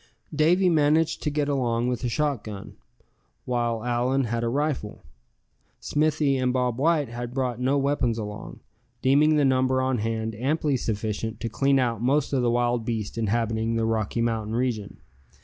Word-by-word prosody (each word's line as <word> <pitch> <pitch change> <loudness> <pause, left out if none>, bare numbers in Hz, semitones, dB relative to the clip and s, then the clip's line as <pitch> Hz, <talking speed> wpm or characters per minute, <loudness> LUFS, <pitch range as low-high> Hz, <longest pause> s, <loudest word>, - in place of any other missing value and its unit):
Davy 170 +5 +3
managed 160 -1 +2
to - - 0
get 145 0 -1
along 120 -4 0
with 125 0 -2
a 125 - 0
shotgun, 115 -8 -3 0.7
while 120 -2 -1
Allan 125 +3 +1
had 115 0 -2
a 115 - 0
rifle. 140 -5 -2 0.8
Smithy 150 -2 +1
and 130 -1 +1
Bob 125 -1 0
White 150 -2 +2
had 120 +1 -6
brought 125 -3 -1
no 130 +3 +1
weapons 135 -5 0
along, 105 -2 -7 0.4
deeming 150 +4 +4
the 145 -2 +3
number 130 0 +2
on 130 -2 0
hand 110 0 -2
amply 140 +5 0
sufficient 110 -1 -3
to 115 - -2
clean 135 +4 +2
out 120 -4 0
most 140 +4 +1
of 130 - +2
the 120 - +2
wild 120 0 +1
beasts 110 -3 -3
inhabiting 115 0 0
the 115 0 0
Rocky 110 +1 -1
Mountain 110 -1 -1
region. 120 -5 -2
125 Hz, 165 wpm, -25 LUFS, 115-140 Hz, 0.8 s, deeming